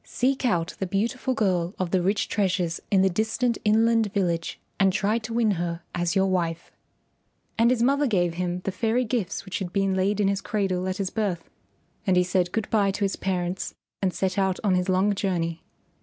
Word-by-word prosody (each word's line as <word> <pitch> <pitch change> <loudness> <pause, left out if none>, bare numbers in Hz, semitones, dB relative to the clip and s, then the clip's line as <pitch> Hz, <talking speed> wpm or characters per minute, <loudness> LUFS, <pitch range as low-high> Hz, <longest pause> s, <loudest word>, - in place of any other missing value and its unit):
Seek 260 +1 0
out 175 -6 0
the 190 - -1
beautiful 235 +7 -1
girl 185 -4 0
of 180 -2 -2
the 185 - +2
rich 195 +4 +1
treasures 185 -4 0
in 190 -2 +4
the - - +5
distant 220 +5 0
inland 225 0 +3
village 170 -5 -1 0.2
and 195 -1 +4
try 210 +5 +1
to 225 0 -8
win 225 -2 +2
her 170 -1 -3
as 175 +1 -1
your 190 0 +4
wife." 170 -3 -1 0.8
And 230 +1 +4
his 245 -2 +2
mother 280 +3 +3
gave 175 -7 +1
him 180 +1 -2
the 195 - -1
fairy 225 +6 0
gifts 215 -6 -2
which 190 - -4
had 185 -3 -4
been 195 0 +1
laid 190 +2 +1
in 205 - +3
his 195 0 0
cradle 190 -3 -1
at 185 0 -2
his 195 -2 -2
birth, 195 -7 -2 0.6
and 185 -1 +4
he 180 - +5
said 180 -1 0
good 220 0 -2
bye 205 -3 +3
to 200 +1 0
his 195 - -1
parents 180 -1 -2 0.3
and 190 -2 +1
set 190 +1 -1
out 190 -1 +1
on 200 -3 +3
his 180 +1 +1
long 190 +3 +3
journey. 170 -4 -2
195 Hz, 205 wpm, -25 LUFS, 180-215 Hz, 0.8 s, the